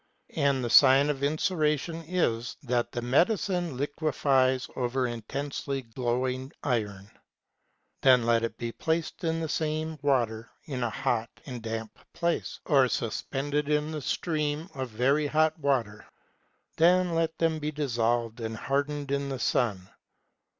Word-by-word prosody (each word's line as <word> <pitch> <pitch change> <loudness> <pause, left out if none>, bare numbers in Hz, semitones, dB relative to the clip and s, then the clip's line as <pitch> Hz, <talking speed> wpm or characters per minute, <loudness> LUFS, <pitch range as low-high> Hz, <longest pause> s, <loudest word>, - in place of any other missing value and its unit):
And 140 -2 +2
the 120 - -1
sign 140 +2 +7
of 140 -2 -6
inceration 155 +1 0
is, 120 -10 -1
that 120 -2 0
the 120 - -4
medicine 175 - +1
liquefies 135 -3 +1
over 125 +1 0
intensely 135 +3 -4
glowing 125 +2 -2
iron. 105 -5 -2 0.9
Then 125 -3 +5
let 115 -1 +3
it 115 - -3
be 120 -1 -4
placed 160 +7 -2
in 165 0 0
the 160 - -2
same 155 0 -2
water 115 -6 0 0.2
in 135 -6 -4
a 120 - 0
hot 115 +1 -1 0.2
and 125 -4 -6
damp 110 -1 -5
place, 170 0 -1
or 135 -4 +4
suspended 140 +5 -2
in 150 +1 +1
the 155 -1 -4
steam 155 +3 -2
of 130 -2 -4
very 135 +7 +2
hot 155 +2 +2
water; 125 -7 -1 0.7
then 180 +1 +4
let 165 -1 0
them 165 -1 +1
be 150 0 -2
dissolved 120 -5 0
and 110 -1 -4
hardened 140 +2 -2
in 140 0 -1
the 135 - -3
sun. 105 -7 0
135 Hz, 140 wpm, -28 LUFS, 120-155 Hz, 0.9 s, sign